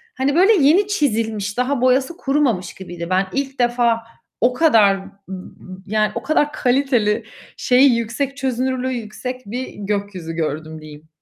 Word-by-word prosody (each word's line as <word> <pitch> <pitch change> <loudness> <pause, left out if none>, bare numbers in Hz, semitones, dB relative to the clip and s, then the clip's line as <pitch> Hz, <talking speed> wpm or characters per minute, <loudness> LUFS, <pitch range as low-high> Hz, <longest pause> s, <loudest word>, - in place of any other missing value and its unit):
hani 275 +3 0
böyle 390 +6 +6
yeni 345 +6 +4
çizilmiş, 225 - -1
daha 250 0 0
boyası 260 +6 +2
kurumamış 270 - 0
gibiydi. 175 -2 -8
Ben 190 +1 +1
ilk 275 -1 -3
defa 240 -1 +2 0.4
o 250 +1 +3
kadar 225 -11 +4
m 195 0 -11 0.2
m 190 -1 -6 0.5
yani 215 0 +1
o 235 - -4
kadar 295 0 +1
kaliteli, 245 -5 +1 0.3
şeyi 255 0 +4
yüksek 255 +5 -3
çözünürlüğü 260 -1 -1
yüksek 250 +3 -6
bir 250 +5 -5
gökyüzü 200 -4 -4
gördüm 155 0 -4
diyeyim. 155 0 -13
240 Hz, 145 wpm, -20 LUFS, 200-270 Hz, 0.5 s, böyle